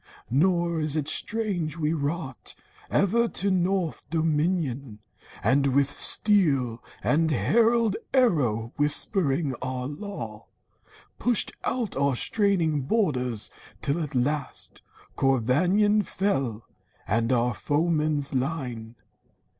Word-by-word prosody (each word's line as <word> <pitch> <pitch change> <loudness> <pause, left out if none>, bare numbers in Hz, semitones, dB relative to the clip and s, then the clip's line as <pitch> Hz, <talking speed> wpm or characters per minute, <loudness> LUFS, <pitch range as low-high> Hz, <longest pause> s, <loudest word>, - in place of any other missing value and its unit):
Nor 170 +3 +2
is 155 -1 0
it 150 -2 -2
strange 180 -6 -1
we 155 -1 0
wrought 150 -3 -4 0.3
Ever 230 +5 +2
to 200 -3 -1
north 185 -2 -1
dominion, 155 - -1 0.5
and 135 -1 +2
with 140 0 +3
steel, 140 - +3 0.2
And 160 +2 +2
herald 225 - +2
arrow 135 - +1
whispering 150 -1 +2
our 130 0 -3
law, 140 - -7 0.7
Pushed 240 -2 +3
out 235 -6 -2
our 140 -1 +1
straining 175 - +1
borders, 130 - -1 0.3
till 145 +5 0
at 150 -4 -5
last 140 +2 -2 0.3
Corvannon 175 - +2
fell, 135 - -2 0.4
and 115 +3 +1
all 120 -1 +2
our - - -3
foeman's 150 +1 0
line. 125 -5 -3
150 Hz, 105 wpm, -26 LUFS, 130-185 Hz, 0.7 s, with